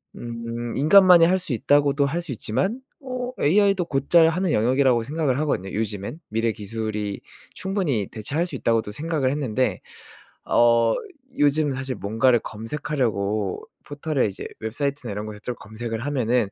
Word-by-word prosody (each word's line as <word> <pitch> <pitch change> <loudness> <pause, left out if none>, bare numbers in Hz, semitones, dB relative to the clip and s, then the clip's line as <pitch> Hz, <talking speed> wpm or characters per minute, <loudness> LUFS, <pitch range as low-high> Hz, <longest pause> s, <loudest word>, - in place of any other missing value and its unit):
음 115 0 -5
인간만이 175 +3 +7
할 185 +2 +3
수 175 -8 -3
있다고도 140 +3 +3
할 170 +4 -2
수 170 -5 -7
있지만 195 - -2 0.2
어 255 -1 -4
AI도 195 +3 +3
곧잘 160 +3 +4
하는 180 0 0
영역이라고 125 +1 +3
생각을 145 -1 -1
하거든요 95 -11 -1
요즘에는. 105 - -3
미래 115 +1 0
기술이 105 -1 -4 0.3
충분히 180 - -1
대체할 145 +11 -2
수 150 - -7
있다고도 115 -4 0
생각을 150 -2 -1
했는데 130 -3 -1 0.7
어 115 -1 +4 0.4
요즘 145 0 +3
사실 130 0 -4
뭔가를 115 +4 +2
검색하려고 110 -5 -2 0.2
포털에 145 -1 -1
이제 100 - -6
웹사이트나 125 +1 -3
이런 105 +1 -4
곳에서 105 -1 -9
또 125 - -2
검색을 110 +2 -6
하면은 125 -6 +1
130 Hz, 350 characters per minute, -23 LUFS, 110-155 Hz, 0.7 s, 인간만이